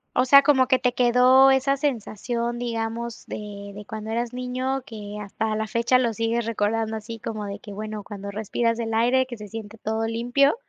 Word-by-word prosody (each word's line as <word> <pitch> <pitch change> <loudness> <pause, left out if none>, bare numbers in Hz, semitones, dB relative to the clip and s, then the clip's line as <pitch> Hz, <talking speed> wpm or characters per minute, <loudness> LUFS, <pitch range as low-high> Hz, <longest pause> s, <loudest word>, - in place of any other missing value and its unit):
O 250 - +3
sea, 280 +2 +8
como 265 -4 +4
que 260 0 +4
te 250 -1 0
quedó 250 +2 +6
esa 265 +1 +3
sensación, 240 -2 -2
digamos 230 0 -4
de 200 -1 -7
de 210 +1 -8
cuando 220 0 -6
eras 235 +1 -1
niño 255 +1 -2
que 210 -2 -8
hasta 215 +2 -2
la 220 0 -1
fecha 235 +3 +2
lo 240 -3 +1
sigues 230 +1 -1
recordando 225 0 0
así 225 +1 -6
como 215 -1 -5
de 200 0 -5
que 210 -4 -10
bueno, 215 0 -5
cuando 200 -1 -7
respiras 225 +2 -1
el 225 -1 -2
aire 245 +3 +3
que 245 -2 -8
se 210 - -9
siente 220 +1 -8
todo 220 +1 -1
limpio. 245 - +2
230 Hz, 195 wpm, -24 LUFS, 215-250 Hz, -, sea